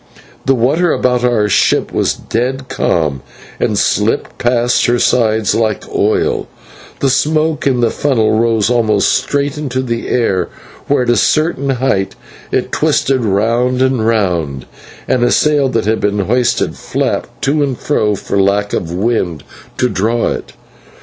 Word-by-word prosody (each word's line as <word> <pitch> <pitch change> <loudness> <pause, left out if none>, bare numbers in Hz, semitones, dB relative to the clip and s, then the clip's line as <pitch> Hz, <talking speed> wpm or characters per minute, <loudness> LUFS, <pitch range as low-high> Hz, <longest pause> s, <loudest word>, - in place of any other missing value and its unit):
The 135 - +4
water 150 +9 +2
about 125 -1 +1
our 120 -4 +2
ship 105 - +1
was - - 0
dead 130 +3 -3
calm, 75 -6 0 0.4
and - - 0
slipped - - 0
past 120 0 +2
her 120 0 +2
sides 110 -4 +2
like 110 -3 0
oil; 105 +2 +1 0.5
the 135 - +2
smoke 155 +2 +1
in 125 -3 +1
the 115 - +2
funnel 120 -7 +1
rose 115 -2 +2
almost 110 -4 +2
straight 140 +2 -1
into 130 -3 -2
the 115 -2 -3
air, 95 -8 0 0.4
where 140 -3 +2
at 120 - +1
a - - +3
certain 140 - +1
height 125 -7 0 0.4
it - - -1
twisted 130 -2 +1
round 115 +5 +1
and 130 -3 +1
round; 85 - 0 0.4
and 125 - +1
a 120 - +3
sail 145 0 +2
that 115 -4 -1
had 110 +1 +1
been 105 0 0
hoisted 120 +2 0
flapped - - -3
to 145 +2 +1
and 135 -4 -1
fro 105 -8 0
for 100 0 -1
lack 100 +1 0
of 85 - -2
wind 90 -5 -1 0.3
to 125 - +2
draw 115 +2 0
it. - - -5
120 Hz, 155 wpm, -15 LUFS, 105-130 Hz, 0.5 s, The